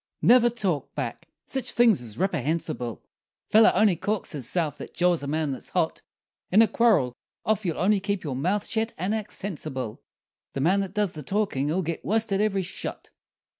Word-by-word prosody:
] - - -53
Never 240 -1 +6
talk 195 -10 -2
back! - - -4 0.2
sich 265 -1 -2
things 235 - +4
is 115 -2 -9
ripperhensible; 150 - -2 0.5
feller 220 +1 +7
only 200 -1 +4
"corks" 205 +3 -1
hisse'f 150 +2 -1
that - - -9
jaws 175 -2 +2
a 140 - -5
man 155 0 -1
that's 130 - -6
hot; - - -1 0.5
In 210 +5 +6
a - - +3
quarrel, 210 - +3 0.3
of 215 -1 +1
you'll 165 -3 -1
only 200 +2 +3
keep 200 -1 -2
your 140 -5 -3
mouth 185 +10 0
shet 225 0 -1
and 185 +5 -1
act 215 -1 -3
sensible, 145 - -4 0.5
The 135 - -2
man 185 +7 +3
that 195 0 -4
does 210 -4 +1
the 155 - -7
talkin'll 180 -2 0
git 170 0 -4
worsted 215 -2 +1
every 200 -3 +1
shot! 175 - -6
185 Hz, 180 wpm, -26 LUFS, 150-210 Hz, 0.5 s, feller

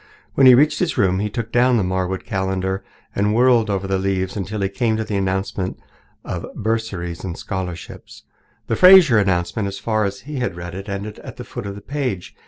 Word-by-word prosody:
When 135 - +5
he 125 - +9
reached 150 +4 +3
his 175 -5 -1
room 95 -4 +2
he 105 +1 -1
took 115 +1 -5
down 125 0 +4
the 105 - +1
Marwood 95 0 -2
calendar 95 0 -2 0.3
and 105 +2 +1
whirled 120 -2 +4
over 95 -1 -1
the 95 0 0
leaves 95 -1 -1
until 105 +1 -4
he 95 - +1
came 110 +2 0
to 110 - -1
the 105 - -4
announcement 95 -1 -2 0.5
of - - -5
bursaries 105 -6 -3
and 90 -3 -5
scholarships. 90 -3 -7 0.4
The - - -1
Fraser 180 - +8
announcement, 95 +2 0
as 100 0 -5
far 110 +1 0
as 100 0 -4
he 145 +4 -7
had 100 -8 -2
read 85 0 -7
it, 95 +2 -7
ended 100 +2 -5
at - - -10
the 125 - -6
foot 120 -3 -7
of 100 - -6
the 100 - -9
page. 125 -8 -4
100 Hz, 205 wpm, -21 LUFS, 95-115 Hz, 0.5 s, he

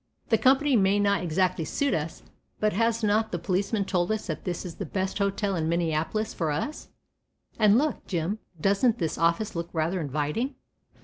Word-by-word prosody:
The 225 - +4
company 275 +1 +4
may 200 -1 +3
not 200 -3 +2
exactly 180 0 +1
suit 280 - 0
us, 160 +1 -3 0.4
but 215 0 +1
has 230 +2 +1
not 215 +1 +2
the 175 - -1
policeman 195 +4 0
told 180 0 0
us 220 0 -2
that 155 -4 -5
this 180 +1 -3
is 175 - -6
the - - -3
best 190 +1 -2
hotel 200 0 0
in 160 -2 -1
Minneapolis 170 +5 0
for 165 -3 -1
us, 165 - -3 0.7
and 215 0 +6
look, 300 +3 -1
Jim, 180 +4 -1 0.2
doesn't 200 +7 +3
this 165 -6 -2
office 170 +6 +1
look 170 0 -3
rather 170 +3 -1
inviting?" 150 - -2
195 Hz, 180 wpm, -27 LUFS, 170-220 Hz, 0.7 s, and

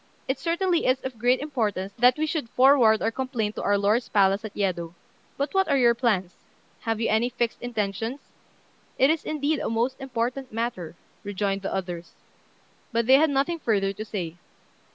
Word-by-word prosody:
It 265 - -1
certainly 345 0 0
is 255 +1 +3
of 260 -4 -6
great 250 +3 +2
importance 210 -10 -2
that 250 +2 +5
we 310 - +1
should 305 -6 -3
forward 250 -4 +5
our 225 - +1
complaint 240 -4 -2
to - - -2
our 205 0 +2
lord's 210 +5 +1
palace 195 0 +3
at 220 - -7
Yedo; 175 -4 -2 0.4
but 280 +1 -2
what 385 0 +2
are 280 -3 +2
your 240 -2 +5
plans? 210 -7 0 0.5
Have 225 -2 -2
you 230 - 0
any 220 +3 +2
fixed 240 -1 -2
intentions?" 225 +2 -3 0.8
"It 270 +3 +5
is, 320 -1 -1
indeed, 300 0 -1
a - - -2
most 240 +4 -1
important 255 0 -3
matter," 220 -8 -4 0.3
rejoined 200 -1 -2
the 195 - -4
others; 175 -3 -5 0.8
but 230 -1 +1
they 260 +3 +7
had 315 +2 +4
nothing 285 +5 0
further 195 -7 0
to 210 - -6
say. 180 -6 -5
235 Hz, 180 wpm, -25 LUFS, 205-265 Hz, 0.8 s, they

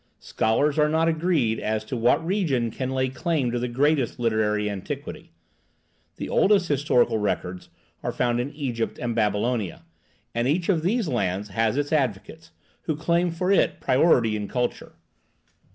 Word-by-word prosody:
Scholars 145 +7 0
are 150 0 +4
not 160 +1 +2
agreed 160 -9 +1
as 110 0 -2
to 125 - -4
what 120 +7 +2
region 155 - 0
can 130 +3 -4
lay 130 0 0
claim 130 0 -1
to 120 - -1
the 125 - -2
greatest 135 +1 +1
literary 110 -3 0
antiquity. 100 -2 -6 0.8
The - - -5
oldest 195 -3 +3
historical 135 -5 +2
records 95 -3 -3 0.3
are - - -2
found 120 -1 0
in 125 +3 -2
Egypt 125 -6 -3
and 120 -1 -2
Babylonia, 105 -2 -1 0.5
and 120 +1 0
each 170 +6 0
of 170 -5 +2
these 210 +4 0
lands 100 -6 -1
has 110 +4 0
its 145 +1 -1
advocates, 145 +4 -2 0.4
who 160 - -1
claim 170 +3 +1
for 180 +3 -1
it 200 - +2
priority 125 -5 +3
in 105 -1 -3
culture. 125 +2 -3
125 Hz, 155 wpm, -24 LUFS, 110-160 Hz, 0.8 s, are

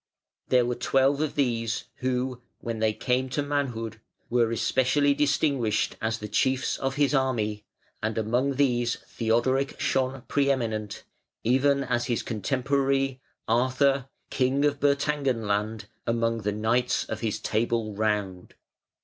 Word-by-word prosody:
There 125 -1 +4
were 125 - 0
twelve 135 +3 +2
of 155 - -1
these 115 -5 0
who, 125 0 -2 0.2
when 115 -1 -4
they 110 0 +2
came 125 +4 0
to 145 +3 -1
manhood, 120 -6 -2 0.3
were 120 -2 +3
especially 130 +5 +2
distinguished 140 -6 +1
as 110 0 0
the 105 - -6
chiefs 130 +5 +1
of 135 0 -1
his 145 0 +2
army, 110 -6 0 0.4
and 110 0 -2
among 125 +5 +1
these 120 -3 +2
Theodoric 120 +4 0
shone 135 -3 0
pre 140 -1 +2
eminent, 110 -6 -2 0.4
even 140 +4 +3
as 120 -2 -1
his 120 -3 -1
contemporary, 135 +3 0 0.3
Arthur, 130 +3 +2 0.2
king 135 +2 +2
of 145 -1 +1
Bertangenland, 120 -7 0 0.2
among 115 0 +1
the 105 0 -1
Knights 120 +4 +1
of 110 - -5
his 110 -3 -2
Table 110 -1 -1
Round. 100 -3 -2
125 Hz, 130 wpm, -27 LUFS, 115-135 Hz, 0.4 s, There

